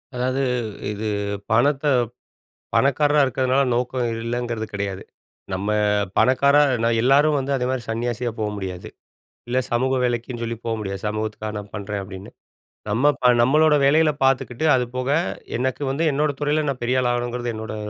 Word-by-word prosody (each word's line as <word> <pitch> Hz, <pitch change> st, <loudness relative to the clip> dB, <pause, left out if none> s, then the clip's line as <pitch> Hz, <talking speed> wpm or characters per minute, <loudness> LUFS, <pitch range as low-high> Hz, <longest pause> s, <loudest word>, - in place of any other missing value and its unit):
அதாவது 130 Hz, +2 st, -1 dB, 0.5 s
இது 105 Hz, +1 st, -5 dB, 0.5 s
பணத்த 135 Hz, +5 st, +2 dB, 0.9 s
பணக்காரரா 145 Hz, +2 st, +3 dB
இருக்கிறதுனால 130 Hz, +1 st, +1 dB
நோக்கம் 125 Hz, 0 st, -1 dB, 0.2 s
இல்லங்கிறது 120 Hz, -2 st, -3 dB
கெடையாது. 100 Hz, -2 st, -4 dB, 0.5 s
நம்ம 95 Hz, +2 st, -2 dB, 0.5 s
பணக்காரர் 140 Hz, +4 st, +4 dB
நா -, -, +3 dB
எல்லாரும் 145 Hz, +4 st, +4 dB
வந்து 135 Hz, +1 st, -2 dB
அதேமாரி 130 Hz, 0 st, -1 dB
சன்னியாசியா 120 Hz, +1 st, -2 dB
போ 110 Hz, -, -1 dB
முடியாது. 95 Hz, -2 st, -6 dB, 0.6 s
இல்ல 125 Hz, -, -1 dB
சமூக 130 Hz, +2 st, +1 dB
வேலைக்குன்னு 120 Hz, 0 st, -2 dB
சொல்லி 115 Hz, 0 st, -3 dB
போக 115 Hz, -, -1 dB
முடியாது. 100 Hz, -2 st, -5 dB
"சமூகத்துக்காக 110 Hz, 0 st, -4 dB
நான் 105 Hz, -1 st, -8 dB
பண்றேன்." 105 Hz, -1 st, -4 dB
அப்படீன்னு. 95 Hz, 0 st, -10 dB, 0.6 s
நம்ம 125 Hz, +8 st, +3 dB
ப -, -, -9 dB, 0.2 s
நம்மளோட 150 Hz, +5 st, +4 dB
வேலைகள 155 Hz, +2 st, +4 dB
பார்த்துக்கிட்டு, 135 Hz, +1 st, +1 dB
அது 125 Hz, -1 st, +2 dB
போக 130 Hz, +2 st, -1 dB, 0.5 s
எனக்கு 130 Hz, +3 st, -2 dB
வந்து 145 Hz, +5 st, 0 dB
என்னோட 150 Hz, +2 st, +1 dB
துறையில 150 Hz, +1 st, +1 dB
நான் 135 Hz, -2 st, -3 dB
பெரியாள் 125 Hz, +1 st, +1 dB
ஆகணும்ங்கிறது 120 Hz, 0 st, -2 dB
என்னோட 110 Hz, 0 st, -6 dB
125 Hz, 140 wpm, -22 LUFS, 110-135 Hz, 0.9 s, பணக்காரர்